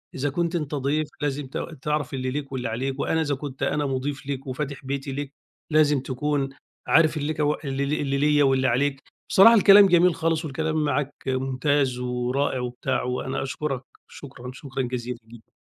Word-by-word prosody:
إذا 140 +2 -1
كنت 170 +4 -1
أنت 150 -3 -2
ضيف 145 +2 0
لازم 145 -1 -2
ت 130 - -6 0.2
تعرَف 150 -1 -1
اللي 130 -1 -2
ليك 140 0 -4
واللي 130 -3 -3
عليك 130 +4 -3
وأنا 160 +3 +1
إذا 145 -3 0
كنت 135 -1 -6
أنا 150 0 0
مضيف 135 +1 -3
ليك 135 -1 -5
وفاتح 140 +1 -5
بيتي 135 0 -3
ليك 140 +1 -5 0.4
لازم 150 -2 +4
تكون 135 +2 -1 0.4
عارف 155 -1 +4
لك 150 +1 -2
اللي 145 -2 -1 0.2
اللي 140 -1 0
ليّا 145 +1 +3
واللي 135 -1 +3
عليك، 135 +3 +1 0.3
بصراحة 230 +5 +8
الكلام 200 -1 +8
جميل 175 -1 +4
خالص 165 0 0
والكلام 155 +2 -1
معاك 145 -1 -1
ممتاز 130 0 0
ورائع 125 +2 -1
وبتاع، 125 0 -2
وأنا 125 +1 -2
أشكرك، 135 -1 -3 0.3
شكرًا، 125 -3 -10
شكرًا 135 0 -5
جزيلًا 125 0 -4
جدًا. 115 -1 -16
140 Hz, 170 wpm, -25 LUFS, 130-150 Hz, 0.4 s, بصراحة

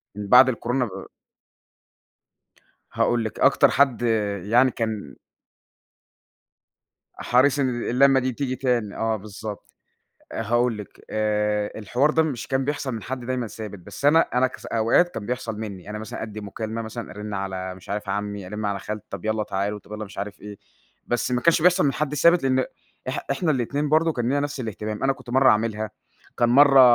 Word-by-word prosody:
من 105 0 -5
بعد 125 +5 +8
الكورونا 125 +1 -1
ب 100 - -8 1.9
هاقول 120 -1 +1
لِك 110 - -5
أكتر - - +5
حد 135 -4 +3 0.4
يعني 120 +6 +4
كان 110 - -4 2.0
حريص 130 +3 +2
إن 135 -2 +2
ال 120 -1 -3
اللمة 135 +2 +5
تيجي 130 +1 -2
تاني 120 -5 -1
آه 110 0 0
بالضبط. 105 0 -8 0.6
آآ - - -3
هاقول 120 0 +1
لِك، 105 - -11
آآ 105 -1 0
الحوار 125 +8 +1
ده 160 - +3
مش 140 -8 -3
كان 135 0 0
بيحصل 145 -2 -2
من 110 - -6
حد 130 -1 -5
دايمًا 125 -1 -2
ثابت، 105 -2 -8
بس 90 - -11
أنا 155 +3 +6
أنا 125 +1 +4
كص 130 - -9
أوقات 115 +10 +3
كان 105 - -5
بيحصل 120 -3 -3
منِّي، 100 -3 -7
أنا 105 - -4
مثلًا 110 0 -6
أدِّي 110 -1 -6
مكالمة 110 +3 -5
مثلًا، 115 +1 -7
أرن 105 +1 -6
على 95 -1 -4
مش 90 - -16
عارف 105 0 -4
عمي، 100 -1 -3
أرن 105 +3 -5
على 100 -1 -1
خال 105 +1 -6
طب 100 -1 -7
يلّا 110 0 0
تعالوا، 105 0 -2
طب 105 - -15
يلّا 105 0 -4
مش 100 - -12
عارف 100 +1 -5
إيه. 105 0 -9 0.5
بس 120 +1 -1
ما 125 0 +1
كانش 170 +3 +3
بيحصل 180 +1 +5
من 140 - +2
حد 150 0 -2
ثابت 170 +4 +4
لأن 130 -1 +2 0.4
إح - - -3
إحنا 175 -4 0
الاتنين 145 +2 0
برضه 160 +2 +3
كان 120 -5 -2
لينا 140 +2 +1
نفس 145 -1 -3
الاهتمام. 110 -2 -5
أنا 135 - +3
كنت 125 - -12
مرّة 130 +1 +5
أعملها، 110 0 0 0.5
كان 120 - +3
مرّة 135 +2 +7
115 Hz, 185 wpm, -24 LUFS, 105-130 Hz, 2.0 s, بعد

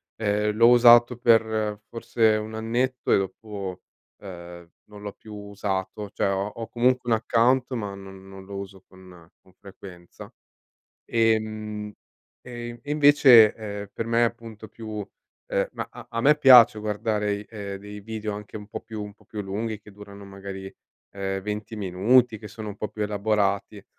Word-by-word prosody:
ehm, 105 -1 0
l'ho 115 +2 +6
usato 120 0 +7
per 110 -3 +2
forse 115 -1 +1
un 110 +1 -6
annetto 120 +3 -1
e - - +5
dopo, 95 -1 -5 0.4
ehm, 85 -3 -10 0.2
non 105 -1 -13
l'ho 100 - -5
più 110 -1 -12
usato, 100 0 -4
cioè 100 - 0
ho 100 +1 -1
ho 115 +2 -7
comunque 125 0 +1
un - - +5
account 120 +3 +2
ma 105 -5 -4
non 95 -1 -12
non 95 0 -11
lo 100 +1 -9
uso 100 -1 -8
con 90 -3 -16
con 95 - -25
frequenza. 95 -2 -13 0.7
Ehm, 110 -2 -1 0.5
e 120 -1 -8
e 145 - -10
invece, 140 -7 +7
ehm, 105 -2 -7
per 115 - -4
me 115 +1 +2
appunto 115 -2 -6
più 110 -2 -7 0.5
ehm, - - +1
ma - - -5
a - - -12
a 115 - -2
me 150 +5 +5
piace 125 -6 +8
guardare, 105 -1 -2
ehm, 100 -3 -7
dei 105 +1 -10
video 110 0 -5
anche 105 +1 -9
un 105 -1 -9
po' - - -6
più 110 -2 -7
un 105 0 -8
po' - - -25
più 105 -1 -6
lunghi, 105 +3 -4
che 105 - -15
durano 100 0 -12
magari, 95 0 -8 0.4
ehm, 95 0 -3
20 105 +2 -5
minuti, 110 +5 +2
che 105 - -10
sono 110 0 -8
un 100 - -7
po' 105 - -4
più 105 - -5
elaborati, 100 -1 -1
105 Hz, 170 wpm, -25 LUFS, 100-115 Hz, 0.7 s, piace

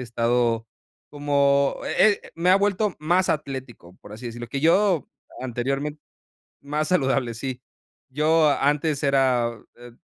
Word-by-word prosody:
estado 115 -1 0 0.4
como, 140 -1 +2
eh 210 -1 +3
eh, - - -14
me 170 +2 +1
ha 190 - +7
vuelto 205 0 0
más 175 +5 +1
atlético, 130 - -5
por 105 - -13
así 115 +3 -8
decirlo, 120 0 -7
que 135 - -3
yo 175 +1 +3 0.3
anteriormente 135 +4 -3 0.6
más 150 +2 -2
saludable, 135 -8 +1
sí, 125 +1 -6 0.5
yo 155 +2 +3
antes 145 +1 +1
era, 130 -4 +1 0.2
eh, 120 0 -13
140 Hz, 130 wpm, -24 LUFS, 120-155 Hz, 0.6 s, ha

